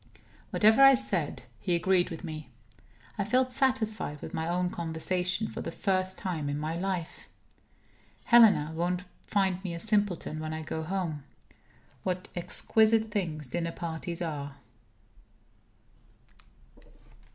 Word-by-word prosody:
Whatever 220 +4 +5
I 270 0 +9
said, 190 - -2 0.2
he 175 - 0
agreed 180 +1 +2
with 165 -1 -7
me; 155 -3 -7 0.7
I - - +2
felt 255 +5 +2
satisfied 225 - 0
with - - -8
my 160 0 -2
own 180 +1 0
conversation, 180 +4 -1
for - - -6
the - - -4
first 185 -2 0
time 160 -6 -3
in 145 - -2
my 155 +2 -3
life. 180 -2 -4 0.9
Helena 220 -10 +6
won't 175 +2 -1 0.2
find 190 -2 +1
me 175 -3 -3
a - - -5
simpleton 205 -6 0
when 155 0 -4
I 160 - -5
go 160 +1 -4
home. 160 -4 -3 0.8
What 185 -1 -3
exquisite 220 +5 +2
things 165 -8 -2
dinner 170 +5 -3
parties 170 0 -4
are! 145 -4 -4
180 Hz, 130 wpm, -29 LUFS, 160-205 Hz, 0.9 s, I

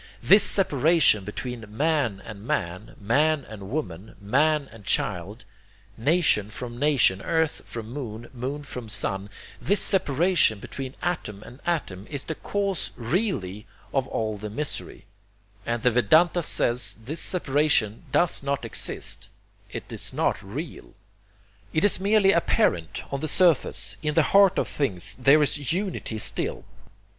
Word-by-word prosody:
...This 205 +2 +7
separation 155 - +4
between 120 +3 -6
man 125 -5 -1
and 105 -3 -9
man, 90 -1 -3
man 145 +7 +1
and 100 -3 -9
woman, 105 - -5
man 140 +8 +1
and 115 -2 -14
child, 100 +3 -2 0.5
nation 130 - +1
from 120 +1 -7
nation, 135 -10 +3
earth 160 -2 0
from 115 -1 -8
moon, 120 -4 -6
moon 135 +4 -5
from 125 -5 -8
sun, 100 -1 0 0.3
this 200 +2 +2
separation 170 - +3
between 130 +5 -8
atom 110 - -3
and 125 - -13
atom 105 - -2
is 140 -2 -4
the 160 - -4
cause 200 +2 -2
really 115 - -2 0.3
of 135 -1 0
all 110 -4 -3
the 105 +1 -6
misery, 145 +8 -4 0.6
and 120 -1 -2
the 125 - +4
Vedanta 160 - +4
says 125 -6 +1
this 155 +6 -4
separation 145 - +1
does 175 - +2
not 140 0 -2
exist, - - -3 0.4
it - - -8
is - - -2
not - - 0
real. 135 - -8 0.8
It 155 - +1
is 205 - +5
merely 200 0 +4
apparent, 85 - +1
on 140 - -1
the 155 - -3
surface. 170 -1 +2
In 150 -1 -2
the 160 - +5
heart 195 -1 +6
of - - 0
things 100 - -1
there 140 +4 +5
is 145 0 0
Unity 180 - -3
still. - - -3
135 Hz, 140 wpm, -25 LUFS, 110-160 Hz, 0.8 s, This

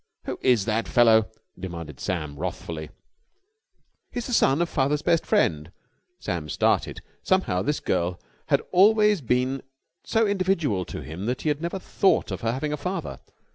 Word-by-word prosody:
"Who - - -5
is 120 -6 +3
that 110 0 0
fellow?" 110 -2 +5 0.3
demanded 85 -6 -7
Sam 75 -5 -3
wrathfully. 80 -3 -5 1.2
"He's 245 -1 -4
the 250 - -4
son 140 -9 +4
of 175 - +1
father's 145 0 0
best 165 -1 +2
friend." 75 +1 +1 0.5
Sam - - -4
started. - - 0 0.2
Somehow 185 - +1
this 145 +7 -1
girl 90 +1 -1 0.3
had - - +3
always 210 0 +5
been 130 +2 0 0.4
so 225 0 +2
individual 185 - 0
to - - -7
him 90 +7 -6
that 125 +2 -2
he 155 - +1
had 150 0 -1
never 170 +3 -3
thought 190 - +1
of 95 - -4
her 115 - 0
having 150 +5 -2
a - - -2
father. 180 +7 -4
130 Hz, 160 wpm, -25 LUFS, -, 1.2 s, fellow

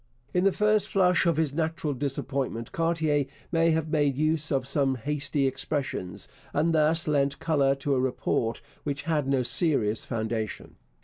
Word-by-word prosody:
In 180 +1 +2
the 195 - +5
first 210 +1 +2
flush 180 -2 +3
of 165 -3 +2
his 155 -3 +1
natural 160 -1 -1
disappointment 135 -3 -3
Cartier 160 -4 +1 0.2
may 165 0 +3
have 160 -1 0
made 145 -4 +1
use 155 +1 0
of 135 -2 +1
some 135 -2 +1
hasty 145 +2 -1
expressions, 135 -8 -3 0.3
and 160 +3 +2
thus 160 +1 +3
lent 140 -2 +1
colour 140 -4 +2
to 140 +1 -1
a 130 - +2
report 125 -2 -1 0.2
which 140 -1 -3
had 150 -3 0
no 135 -2 +2
serious 120 - +1
foundation. 110 -2 -4
145 Hz, 160 wpm, -27 LUFS, 135-160 Hz, 0.3 s, the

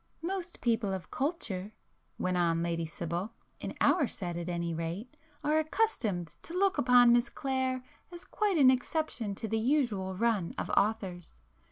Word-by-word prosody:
"Most 365 0 -4
people 225 -4 +1
of 185 - -8
culture," 225 - -2 0.4
went 185 0 0
on 170 -1 +2
Lady 170 -1 -1
Sibyl—"in 170 +7 -6
our 300 -8 +4
set 175 -6 -4
at 170 +1 -4
any 170 -1 -2
rate, 170 - -4 0.3
are 305 +1 +3
accustomed 305 - 0 0.2
to 335 - -8
look 395 0 +2
upon 245 -1 +6
Miss 240 +2 +3
Clare 260 -1 -1 0.3
as 345 0 -8
quite 415 -4 0
an 265 -3 +7
exception 255 -5 -1
to 220 - -4
the 220 +1 0
usual 220 -7 +1
run 215 -4 0
of - - -3
authors. 195 - 0
225 Hz, 155 wpm, -31 LUFS, 180-275 Hz, 0.4 s, an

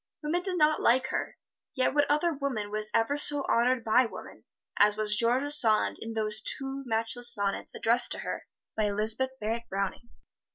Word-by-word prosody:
Women 325 +4 -1
did 365 0 -3
not 305 -1 +2
like 260 +2 +2
her, - - -4 0.4
yet 255 0 +1
what 290 0 +1
other 300 +3 +1
woman 260 -8 -4
was 215 0 0
ever 230 +6 0
so 290 -1 +1
honored 240 +1 +1
by 230 +3 +3
woman - - -12 0.3
as 210 0 +4
was 210 -1 0
George 250 +6 +1
Sand 225 -8 +3
in 225 0 -7
those 215 -1 -2
two 270 +4 -4
matchless 230 +2 +3
sonnets 200 -3 0
addressed 240 +2 +2
to - - -7
her - - -6 0.3
by 215 - 0
Elizabeth 215 +5 0
Barrett 230 +2 -4
Browning? 195 +4 -4
235 Hz, 175 wpm, -28 LUFS, 215-275 Hz, 0.4 s, as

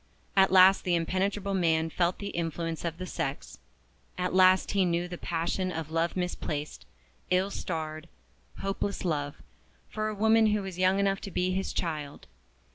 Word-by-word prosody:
At 190 -1 +5
last 190 +1 +7
the 180 -2 +1
impenetrable 195 +4 -1
man 165 -3 +1
felt 175 +1 +1
the 200 - -5
influence 165 -2 -3
of 165 -1 -3
the 185 - -5
sex; - - -5 0.6
at 180 0 -1
last 185 0 +5
he 200 -1 +2
knew 175 0 0
the 175 - -6
passion 175 +2 -2
of 160 -2 -5
love 165 +2 0
misplaced, 155 -4 -4 0.4
ill 185 +2 +2
starred, 160 -3 -5 0.5
hopeless 195 0 -2
love, 145 -4 -1 0.6
for 215 0 -2
a 215 - -3
woman 220 +1 +4
who 210 -1 +1
was 190 -2 -7
young 185 +1 +3
enough 195 0 +1
to - - -6
be 180 0 0
his 190 +1 -2
child. 150 -4 -4
180 Hz, 165 wpm, -29 LUFS, 165-195 Hz, 0.6 s, last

